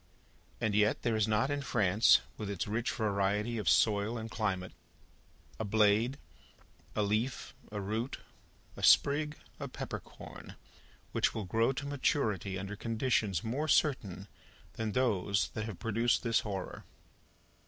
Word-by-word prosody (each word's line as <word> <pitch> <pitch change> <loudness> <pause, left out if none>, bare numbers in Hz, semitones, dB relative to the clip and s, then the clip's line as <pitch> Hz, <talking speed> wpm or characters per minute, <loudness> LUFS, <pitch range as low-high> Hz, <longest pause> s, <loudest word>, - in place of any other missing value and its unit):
And 110 -3 0
yet 105 +1 +2
there 115 -2 +1
is 110 -1 +2
not 110 +6 +1
in 145 0 -1
France, 110 -5 +4
with 105 -2 -5
its 100 -1 -3
rich 115 +3 -1
variety 105 +2 0
of 95 -8 +1
soil 105 - +3
and 110 0 -6
climate, 95 -4 -2 0.9
a - - -1
blade, 110 +4 +3 0.8
a 105 - +2
leaf, 110 +5 -1 0.2
a 105 - -3
root, 110 +6 -3 0.6
a - - -9
sprig, 150 +1 +4 0.2
a - - -4
peppercorn, - - -8 0.6
which - - +1
will 110 - -3
grow 115 +7 +2
to 140 +2 -5
maturity 110 - 0
under 100 +2 -5
conditions 110 -5 0
more 135 +8 -2
certain 105 - +1 0.5
than 110 -2 -3
those 100 -6 +1
that 110 - -4
have 110 -6 -6
produced 115 +1 +1
this 115 -2 +2
horror. 95 -3 -5
110 Hz, 140 wpm, -32 LUFS, 100-120 Hz, 0.9 s, France